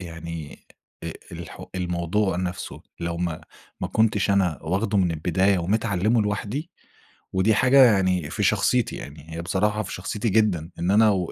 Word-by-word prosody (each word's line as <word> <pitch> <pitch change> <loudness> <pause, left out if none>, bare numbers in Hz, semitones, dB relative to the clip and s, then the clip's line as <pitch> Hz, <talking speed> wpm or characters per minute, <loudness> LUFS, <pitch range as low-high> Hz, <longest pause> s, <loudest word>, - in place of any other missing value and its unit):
يعني 85 -3 -7 0.4
آآ، - - -4 0.2
الحو - - -8
الموضوع 90 +2 0
نَفْسه 90 0 -4 0.2
لو 85 0 -2
ما 85 -2 -2 0.4
ما - - -2
كنتش 105 -2 +2
أنا 95 -5 +2
واخده 100 +5 0
من 90 -3 +2
البداية 90 +5 +1
ومتعلّمه 105 +4 +1
لوحدي 105 +9 -3 0.6
ودي 95 +3 +3
حاجة 135 +4 +6
يعني 95 -7 +2
في - - -2
شخصيتي، 125 -3 +2
يعني 75 +3 -10
هي 85 - -4
بصراحة 105 +5 0
في - - -7
شخصيتي 100 +4 -2
جدًا 95 -6 +2
إن 85 +3 +1
أنا 110 +2 +6
و 95 -4 0
95 Hz, 155 wpm, -24 LUFS, 85-105 Hz, 0.6 s, حاجة